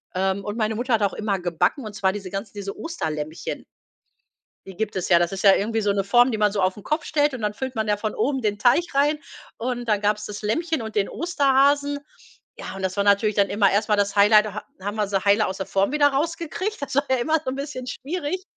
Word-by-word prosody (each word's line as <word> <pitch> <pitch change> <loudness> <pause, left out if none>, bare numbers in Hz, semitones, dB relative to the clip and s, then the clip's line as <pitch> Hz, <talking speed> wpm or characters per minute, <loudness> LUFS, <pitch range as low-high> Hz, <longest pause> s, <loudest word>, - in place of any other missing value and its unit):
ähm, 190 +1 0
und 205 +3 -5
meine 220 0 0
Mutter 240 +1 +1
hat 215 - -2
auch 200 - +1
immer 205 -3 -2
gebacken, 180 - 0
und 215 - -7
zwar 190 -2 +1
diese 195 -1 -6
ganzen 195 +3 -5
diese 200 -1 -6
Osterlämmchen. 155 - -5 1.0
Die 190 - -9
gibt 215 +1 -3
es. 185 - -2
Ja, 170 -1 +6
das 175 +1 0
ist 195 - -5
ja 195 -2 +8
irgendwie 225 +2 -1
so 205 -1 +1
'ne 195 -1 0
Form, 240 +5 +4
die 220 - -2
man 210 -1 +3
so 200 - -2
auf 185 0 +1
'n 205 - -12
Kopf 305 +1 -1
stellt, 295 -2 +1
und 235 - -7
dann 210 0 -1
füllt 260 +3 -5
man 220 -1 -1
ja 210 - +1
von 215 0 -3
oben 270 -2 0
den 205 -2 0
Teig 245 +10 +4
rein, 295 +2 +2 0.4
und 245 0 -3
dann 210 -2 +1
gab's 210 0 0
das 210 0 -7
Lämmchen 320 +7 -1
und 220 -1 -7
den 200 -1 +2
Osterhasen. 285 -3 +2 0.6
Ja, - - -7
und 195 - -7
das 190 0 -2
war 200 - +2
natürlich 205 +1 +3
dann 200 -1 +3
immer 200 -1 +3
erst 210 +2 +1
mal 210 - +4
das 200 0 0
Highlight 210 +1 +6
da 210 - -6
ha - - -6 0.2
haben 205 +2 -4
wir 210 -2 0
sie 195 -1 0
heile 205 +1 +4
aus 190 - -4
der 190 - -4
Form 195 +6 0
wieder 295 -1 +4
rausgekriegt 330 +7 -2
das 280 - -4
war 280 - +3
ja 260 - +3
immer 310 +7 +1
so - - -1
'n 265 - -4
bisschen 275 -2 -5
schwierig. 310 +7 -4
215 Hz, 260 wpm, -23 LUFS, 200-270 Hz, 1.0 s, ja